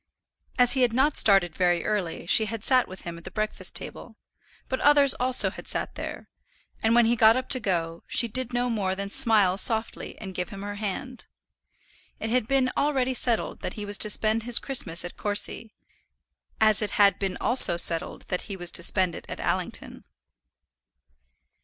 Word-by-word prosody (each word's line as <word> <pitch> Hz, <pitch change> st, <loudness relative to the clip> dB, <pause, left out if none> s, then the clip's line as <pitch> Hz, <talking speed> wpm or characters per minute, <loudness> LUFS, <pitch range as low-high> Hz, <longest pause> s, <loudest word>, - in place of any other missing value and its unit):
As 245 Hz, -1 st, +5 dB
he 265 Hz, -, 0 dB
had 245 Hz, -2 st, +2 dB
not 275 Hz, +4 st, +1 dB
started 195 Hz, -5 st, +3 dB
very 175 Hz, -1 st, 0 dB
early 195 Hz, -7 st, -3 dB
she 220 Hz, +5 st, +2 dB
had 220 Hz, 0 st, -6 dB
sat 255 Hz, -1 st, +3 dB
with 185 Hz, -, -11 dB
him 170 Hz, -1 st, -8 dB
at -, -, -18 dB
the -, -, -8 dB
breakfast 215 Hz, 0 st, -3 dB
table; -, -, -9 dB, 0.5 s
but 260 Hz, -, -3 dB
others 285 Hz, -2 st, +4 dB
also 255 Hz, 0 st, +5 dB
had -, -, -12 dB
sat -, -, -4 dB
there, -, -, -8 dB, 0.5 s
and 225 Hz, +1 st, +1 dB
when 240 Hz, -1 st, +4 dB
he 235 Hz, +1 st, +1 dB
got 225 Hz, +1 st, +4 dB
up 255 Hz, -, -5 dB
to 255 Hz, -, 0 dB
go, 170 Hz, -6 st, -3 dB
she 235 Hz, -, 0 dB
did 250 Hz, +2 st, -3 dB
no 245 Hz, 0 st, -1 dB
more 200 Hz, -5 st, -2 dB
than 200 Hz, +1 st, -6 dB
smile 200 Hz, -5 st, +4 dB
softly 225 Hz, +1 st, +1 dB
and 190 Hz, -3 st, -9 dB
give 180 Hz, +2 st, -5 dB
him 195 Hz, -2 st, -9 dB
her 205 Hz, 0 st, -6 dB
hand. 225 Hz, +5 st, -6 dB, 0.9 s
It 220 Hz, -, -4 dB
had 250 Hz, -3 st, 0 dB
been 265 Hz, -1 st, +1 dB
already 265 Hz, -3 st, 0 dB
settled 240 Hz, -2 st, -2 dB
that -, -, -5 dB
he 210 Hz, -, -7 dB
was 205 Hz, 0 st, -3 dB
to 215 Hz, -, +5 dB
spend 215 Hz, +2 st, 0 dB
his 235 Hz, +1 st, +4 dB
Christmas 180 Hz, -11 st, -1 dB
at 175 Hz, -, -9 dB
Courcy; 205 Hz, +2 st, -1 dB, 0.9 s
as 215 Hz, -1 st, +3 dB
it 210 Hz, -2 st, -3 dB
had 200 Hz, -1 st, +3 dB
been 195 Hz, -2 st, -3 dB
also 240 Hz, -8 st, +3 dB
settled 165 Hz, -1 st, +2 dB
that 180 Hz, -, -4 dB
he 195 Hz, -, -6 dB
was 175 Hz, -1 st, -2 dB
to -, -, +2 dB
spend 185 Hz, 0 st, +1 dB
it -, -, -11 dB
at -, -, -7 dB
Allington. -, -, -4 dB
215 Hz, 190 wpm, -25 LUFS, 190-245 Hz, 0.9 s, As